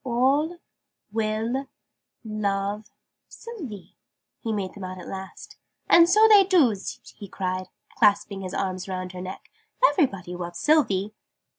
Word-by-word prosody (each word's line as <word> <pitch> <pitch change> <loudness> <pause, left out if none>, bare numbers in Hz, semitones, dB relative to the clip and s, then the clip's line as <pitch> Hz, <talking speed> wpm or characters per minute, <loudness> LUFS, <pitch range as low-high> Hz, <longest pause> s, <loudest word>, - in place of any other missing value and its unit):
"All 270 +7 +1 0.5
will 225 +5 -1 0.6
love 205 -1 -2 0.4
Sylvie," 300 - -9 0.4
he 225 - -3
made 200 -3 -3
them 200 - -9
out 185 0 -6
at 180 - -10
last. 190 0 -9 0.3
"And 340 0 +7
so 430 +4 +6
they 415 -2 +8
doos!" 285 - +2 0.2
he 200 - -9
cried, 185 -1 -3 0.3
clasping 205 -2 +3
his 185 -1 -5
arms 185 -1 -2
round 185 -1 -4
her 180 -1 -8
neck. 185 +1 -8 0.4
"Everybody 195 - 0
loves 175 -1 -6
Sylvie!" 215 -10 +2
210 Hz, 130 wpm, -25 LUFS, 185-270 Hz, 0.6 s, they